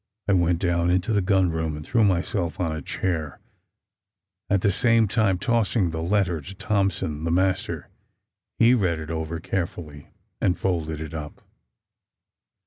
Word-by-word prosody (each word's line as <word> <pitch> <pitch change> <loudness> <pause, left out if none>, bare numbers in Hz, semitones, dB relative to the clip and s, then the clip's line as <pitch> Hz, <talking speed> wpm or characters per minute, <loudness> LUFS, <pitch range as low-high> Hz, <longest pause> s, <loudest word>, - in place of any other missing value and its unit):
I 100 - +3
went 85 -2 +3
down 85 -1 +1
into 90 +5 +1
the 105 - +3
gun 95 -2 +2
room 80 -1 -2
and 75 - -8
threw 115 -2 +2
myself 90 -2 0
on 85 -3 -1
a 80 - -5
chair, 80 -7 -3 1.1
at 100 -1 +2
the 100 - +3
same 115 +1 +3
time 100 -3 +2
tossing 110 -3 +1
the 80 0 -4
letter 90 -2 +1
to 95 +7 -10
Thompson, 95 -6 -1
the 85 - -1
master. 95 +2 0 0.7
He 115 +2 +6
read 90 -9 +1
it 80 0 -6
over 80 0 -3
carefully, 80 -4 -4 0.3
and 90 -1 +2
folded 80 -4 -2
it 80 0 -6
up. 75 -2 -7
90 Hz, 155 wpm, -24 LUFS, 80-100 Hz, 1.1 s, He